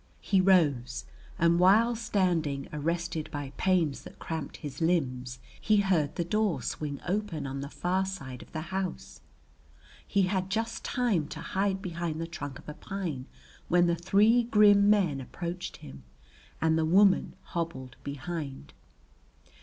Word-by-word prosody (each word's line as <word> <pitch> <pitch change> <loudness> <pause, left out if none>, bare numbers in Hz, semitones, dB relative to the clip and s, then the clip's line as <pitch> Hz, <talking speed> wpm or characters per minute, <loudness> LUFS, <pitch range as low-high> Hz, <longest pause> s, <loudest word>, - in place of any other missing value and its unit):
He 195 -2 +3
rose 145 -10 +2 0.3
and 170 +1 +3
while 220 +6 +5
standing 175 -11 0
arrested 165 +1 -2
by 145 -3 -5
pains 175 -7 +1
that - - -12
cramped 160 -2 -5
his 145 0 -7
limbs, 130 -7 0 0.2
he 215 - +3
heard 180 -8 +2
the 170 - -1
door 190 - 0
swing 145 +3 -4
open 185 -6 -2
on 135 0 -4
the 140 - -6
far 185 +4 0
side 135 -10 -6
of - - -14
the 160 - -4
house. 190 -1 -4 0.9
He 200 -1 +2
had 185 0 0
just 225 +3 -2
time 220 - 0
to 155 - -7
hide 195 +2 -1
behind 170 -3 -3
the 165 - -2
trunk 145 -5 -6
of - - -16
a 150 - -5
pine 165 -9 -5 0.4
when 175 0 +4
the 170 0 +2
three 205 +7 +4
grim 210 -3 +5
men 180 -10 +3
approached 175 +6 -6
him 70 -1 -11 0.6
and 160 0 +2
the - - +2
woman 190 +4 +4
hobbled 130 -7 -5
behind. 145 -1 -6
170 Hz, 150 wpm, -29 LUFS, 145-195 Hz, 0.9 s, while